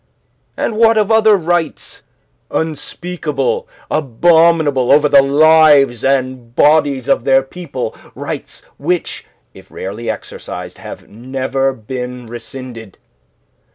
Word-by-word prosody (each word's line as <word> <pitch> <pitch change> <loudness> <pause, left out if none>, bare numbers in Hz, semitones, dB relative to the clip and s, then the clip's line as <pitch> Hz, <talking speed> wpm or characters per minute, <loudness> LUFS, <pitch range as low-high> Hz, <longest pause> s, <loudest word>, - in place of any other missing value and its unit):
"And 220 - -2
what 225 0 +4
of 215 0 +1
other 220 -2 +5
rights, 175 -3 -2 0.5
unspeakable, 175 - -3 0.2
abominable, 155 -1 +3
over 150 +1 +5
the 140 -1 +6
lives 145 -3 +4
and 130 -3 -1
bodies 145 -4 +3
of 135 - +2
their 135 0 +3
people, 135 -5 -6 0.2
rights - - -7 0.2
which, 175 +4 -2 0.3
if - - -16
rarely 105 +5 -6
exercised, - - -7
have - - -10
never 130 +4 -2
been 125 +1 -7
rescinded. 120 -2 -10
140 Hz, 105 wpm, -16 LUFS, 130-165 Hz, 0.5 s, the